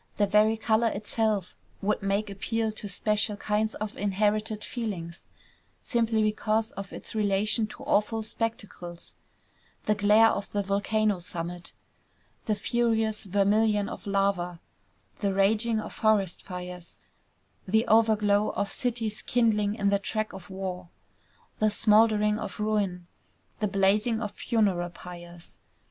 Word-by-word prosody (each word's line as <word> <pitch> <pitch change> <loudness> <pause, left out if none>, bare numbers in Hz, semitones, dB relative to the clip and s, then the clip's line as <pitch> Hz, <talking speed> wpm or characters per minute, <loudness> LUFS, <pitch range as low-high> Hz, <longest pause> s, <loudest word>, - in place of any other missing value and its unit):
The 205 - +4
very 210 +2 +3
color 220 +1 +2
itself 210 -2 -1 0.3
would 210 +2 +1
make 200 +1 -1
appeal 220 +3 -1
to 210 -1 -5
special 210 +1 0
kinds 215 +2 -1
of 215 0 -5
inherited 210 +2 0
feelings, 185 -8 -5 0.6
simply 230 -2 +1
because 215 +1 0
of 195 0 -7
its - - -8
relation 215 +1 +1
to - - -11
awful 220 +2 +1
spectacles, 215 -6 -5 0.7
the 210 - +3
glare 210 +2 +5
of 200 - -4
the 205 -1 0
volcano 205 +1 +1
summit, 175 0 -6 0.7
the 215 - +2
furious 225 0 0
vermilion 205 +2 +2
of - - -8
lava, 195 -3 0 0.6
the 200 -2 0
raging 215 +3 +2
of - - -6
forest 205 -5 +1
fires, 180 -1 -8 0.7
the 220 +4 +3
overglow 215 -2 +4
of 200 -1 -1
cities 225 -4 -2
kindling 215 -4 +1
in 200 -3 +1
the 200 0 +2
track 215 +2 -3
of 190 0 -10
war, 190 -2 -5 0.7
the 215 - +4
smouldering 210 0 +4
of - - -6
ruin, 205 -4 -1 0.5
the 210 - +1
blazing 205 +3 +2
of 210 -3 -3
funeral 195 -6 0
pyres. 175 -1 -11
210 Hz, 130 wpm, -27 LUFS, 195-220 Hz, 0.7 s, glare